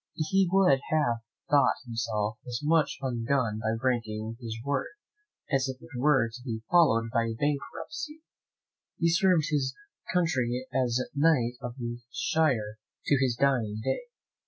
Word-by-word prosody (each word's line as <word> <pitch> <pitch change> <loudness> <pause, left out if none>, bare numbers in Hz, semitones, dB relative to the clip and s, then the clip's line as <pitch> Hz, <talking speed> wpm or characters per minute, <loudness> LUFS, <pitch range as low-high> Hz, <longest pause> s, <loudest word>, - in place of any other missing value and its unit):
He 185 +4 +2
would 185 -9 +4
have 145 -7 +2 0.3
thought 145 -1 +4
himself 110 -2 -2
as 120 -1 -3
much 155 0 +2
undone 120 -3 0
by 110 +1 -1
breaking 115 -3 -1
his 115 -2 -5
word, 140 -1 0 0.6
as 135 -1 +2
if 130 0 -6
it 120 - -14
were 135 -1 +3
to 115 +2 -10
be 110 -4 -4
followed 115 -11 +4
by 115 -1 +1
bankruptcy. 300 - -3 0.7
He 170 - +2
served 170 -3 +3
his 140 -3 0 0.4
country 130 -8 0
as 125 -1 +1
knight 140 -5 +3
of 120 -1 -5
this 120 -1 -5
shire 115 -9 0 0.3
to 145 - +3
his 125 -3 +2
dying 120 -6 +1
day. - - -1
130 Hz, 140 wpm, -28 LUFS, 115-150 Hz, 0.7 s, would